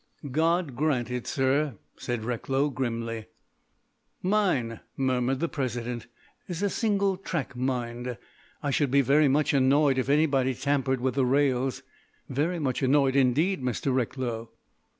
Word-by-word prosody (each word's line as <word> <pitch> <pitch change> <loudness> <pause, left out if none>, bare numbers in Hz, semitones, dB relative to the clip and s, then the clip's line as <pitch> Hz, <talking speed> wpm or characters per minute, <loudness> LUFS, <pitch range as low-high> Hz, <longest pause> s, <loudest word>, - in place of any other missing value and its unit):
"God 165 -1 +1
grant 130 -3 0
it, 125 -1 -4
sir," 135 -1 +1 0.2
said 120 -3 -4
Recklow 135 +4 0
grimly. 115 -3 -3 1.0
"Mine," 180 - +1 0.2
murmured 130 0 +1
the 170 - 0
President, 120 -5 -3 0.4
"is 180 +1 -4
a 200 - +1
single 200 -4 +1
track 170 -8 -4
mind. 125 -1 -3 0.5
I 145 - 0
should 140 0 +1
be 140 +2 +4
very 145 +3 +4
much 145 +3 +2
annoyed 135 0 +4
if 130 - -2
anybody 140 -3 +2
tampered 135 -1 0
with 130 0 0
the 135 -1 +2
rails—very 135 +4 -1
much 135 -6 -1
annoyed 135 0 +3
indeed, 140 +7 +2
Mr. 125 +2 -1
Recklow." 120 -2 -2
135 Hz, 130 wpm, -27 LUFS, 125-150 Hz, 1.0 s, be